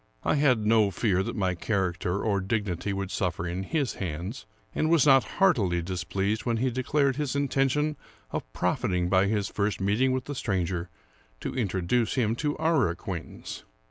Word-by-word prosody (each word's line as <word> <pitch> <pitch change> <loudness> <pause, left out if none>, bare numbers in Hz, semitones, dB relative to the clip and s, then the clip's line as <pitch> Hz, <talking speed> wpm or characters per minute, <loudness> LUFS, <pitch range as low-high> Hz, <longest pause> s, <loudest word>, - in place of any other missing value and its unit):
I - - +2
had 135 -7 +3
no 110 -2 +4
fear 95 -2 +1
that - - -3
my 95 -2 +1
character 90 0 -1
or 100 -3 +1
dignity 100 -2 -2
would 100 -1 -3
suffer 85 -2 -1
in 85 +2 -3
his 135 +3 -1
hands, 90 - -4 0.3
and 155 - +1
was 165 -4 +5
not 135 -2 +6
heartily 100 - +3
displeased 95 +4 -2
when 120 -2 0
he 130 +2 +1
declared 135 +2 +1
his 145 -3 -1
intention 140 +2 +1 0.3
of - - -4
profiting 90 -1 0
by 95 +1 +4
his 100 -1 0
first 100 -2 -1
meet 100 +5 +1
ing 130 0 +4
with 130 0 -1
the 145 - -4
stranger 90 -7 -2 0.5
to - - -4
introduce 105 0 0
him 115 -4 +1
to 150 +1 -1
our 160 - +2
acquaintance. 85 0 -6
105 Hz, 175 wpm, -27 LUFS, 95-130 Hz, 0.5 s, not